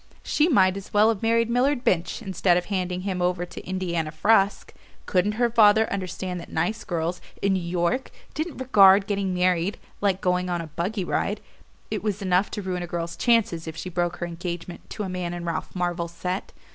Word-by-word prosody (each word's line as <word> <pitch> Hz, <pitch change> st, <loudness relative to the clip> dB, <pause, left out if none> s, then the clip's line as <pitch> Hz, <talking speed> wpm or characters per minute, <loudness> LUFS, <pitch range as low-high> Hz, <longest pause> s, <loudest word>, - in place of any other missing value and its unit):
She 305 Hz, +3 st, +2 dB
might 190 Hz, -, +4 dB
as 200 Hz, -, -9 dB
well 210 Hz, 0 st, +5 dB
have 220 Hz, -4 st, -1 dB
married 230 Hz, 0 st, +2 dB
Millard 250 Hz, +2 st, +1 dB
Binch, 175 Hz, -6 st, 0 dB
instead 180 Hz, -1 st, +2 dB
of 180 Hz, -, -1 dB
handing 185 Hz, -2 st, -2 dB
him 185 Hz, -1 st, -2 dB
over 180 Hz, 0 st, 0 dB
to -, -, -10 dB
Indiana 175 Hz, -4 st, -2 dB
Frusk! 195 Hz, +5 st, +2 dB, 0.3 s
Couldn't 195 Hz, +3 st, +1 dB
her 240 Hz, +2 st, +2 dB
father 220 Hz, -1 st, +5 dB
understand 185 Hz, -1 st, -4 dB
that 170 Hz, -, -11 dB
nice 220 Hz, +8 st, -1 dB
girls, 170 Hz, 0 st, -2 dB, 0.2 s
in 200 Hz, -1 st, +1 dB
New 190 Hz, -, 0 dB
York, 175 Hz, +9 st, -1 dB, 0.2 s
didn't 315 Hz, +1 st, -4 dB
regard 200 Hz, -6 st, +6 dB
getting 200 Hz, -2 st, -1 dB
married 180 Hz, +1 st, +1 dB, 0.2 s
like 195 Hz, -2 st, +2 dB
going 180 Hz, -2 st, 0 dB
on 175 Hz, -1 st, -1 dB
a 165 Hz, -, -4 dB
buggy 180 Hz, +6 st, -3 dB
ride? -, -, -1 dB, 0.5 s
It -, -, -2 dB
was 210 Hz, -2 st, -2 dB
enough 185 Hz, 0 st, +2 dB
to 205 Hz, -, -5 dB
ruin 180 Hz, -1 st, -3 dB
a 175 Hz, -, -4 dB
girl's 170 Hz, 0 st, -4 dB
chances 220 Hz, -9 st, +2 dB
if 160 Hz, 0 st, -6 dB
she 185 Hz, -, -5 dB
broke 175 Hz, -1 st, -1 dB
her 175 Hz, -, -4 dB
engagement 175 Hz, 0 st, -6 dB
to 210 Hz, -, -4 dB
a -, -, -3 dB
man 180 Hz, -1 st, -3 dB
in 175 Hz, 0 st, -6 dB
Ralph 170 Hz, -1 st, -3 dB
Marvell's 175 Hz, -1 st, -2 dB
set. 180 Hz, +3 st, -4 dB
185 Hz, 200 wpm, -25 LUFS, 175-205 Hz, 0.5 s, regard